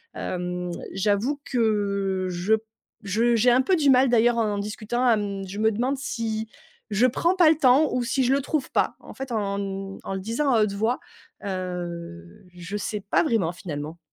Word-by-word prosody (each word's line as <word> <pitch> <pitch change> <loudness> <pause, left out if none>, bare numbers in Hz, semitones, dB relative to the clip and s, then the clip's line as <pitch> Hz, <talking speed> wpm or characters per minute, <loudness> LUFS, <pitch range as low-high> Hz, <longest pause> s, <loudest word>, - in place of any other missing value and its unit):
Hem, 180 0 -3 0.2
j'avoue 210 +9 0
que 200 -5 0
je 180 +5 +2
p 220 - -8 0.4
je 230 +4 +2
j'ai 245 +3 +4
un 250 +2 +5
peu 370 +6 +2
du 290 -3 +3
mal 260 0 +5
d'ailleurs 240 0 +4
en 215 -3 +1
en - - -3
discutant 215 +4 -2
à 235 - +6
m 200 -2 -2
je 195 +2 -7
me 220 0 +3
demande 250 +6 0
si 225 -5 -3 0.4
je 210 +4 +3
prends 335 +8 +1
pas 345 -4 +6
le 320 - +5
temps 270 +2 +5
ou 250 -1 0
si 265 +1 0
je 255 - +3
le 280 - +2
trouve 285 0 -2
pas - - +1
en - - -12
fait, 265 -2 -7
en 200 -3 -1
n 195 -1 -5
en - - -4
le - - -3
disant 230 +8 0
à 220 - +4
haute 200 -2 -1
voix, 220 +5 0 0.5
heu, 175 - -6
je 175 +2 -7
sais 210 0 -3
pas - - +3
vraiment, 215 - +1
finalement. 155 -2 -6
215 Hz, 205 wpm, -25 LUFS, 195-250 Hz, 0.5 s, à